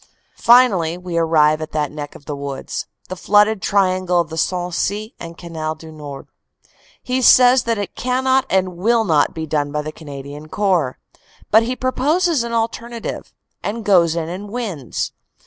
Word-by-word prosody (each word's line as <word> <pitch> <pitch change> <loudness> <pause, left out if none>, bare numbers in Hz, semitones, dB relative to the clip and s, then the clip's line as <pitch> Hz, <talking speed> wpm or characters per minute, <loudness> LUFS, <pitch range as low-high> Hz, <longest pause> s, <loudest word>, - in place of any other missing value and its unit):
Finally 200 -9 +5
we 180 -1 -6
arrive 155 -2 +3
at 155 - -6
that 150 -2 -1
"neck 145 -1 -7
of 145 - -14
the 145 - -4
woods," 140 -1 -5 0.2
the 185 - -5
flooded 210 +2 +3
triangle 185 -2 +2
of 170 -2 -1
the - - -4
Sensee 180 - -2
and 170 0 -9
Canal 160 -2 -4
du 160 +1 -12
Nord. 145 -3 -9 0.8
He 255 0 -1
says 250 0 +6
that 230 -1 0
it 205 -3 -4
cannot 260 +1 +1
and 185 -1 +1
will 225 +5 +2
not 160 -8 +2
be 160 -1 -3
done 145 -2 -1
by 150 0 -2
the 155 - -5
Canadian 145 0 -9
Corps. 180 -10 0 0.5
But 220 - +7
he 245 +3 -2
proposes 290 +4 +1
an 235 - -5
alternative; 230 0 -3 0.3
and 220 +1 -4
goes 170 -5 +4
in 165 -2 -2
and 190 +4 -6
wins. 200 - -4
180 Hz, 165 wpm, -19 LUFS, 155-230 Hz, 0.8 s, But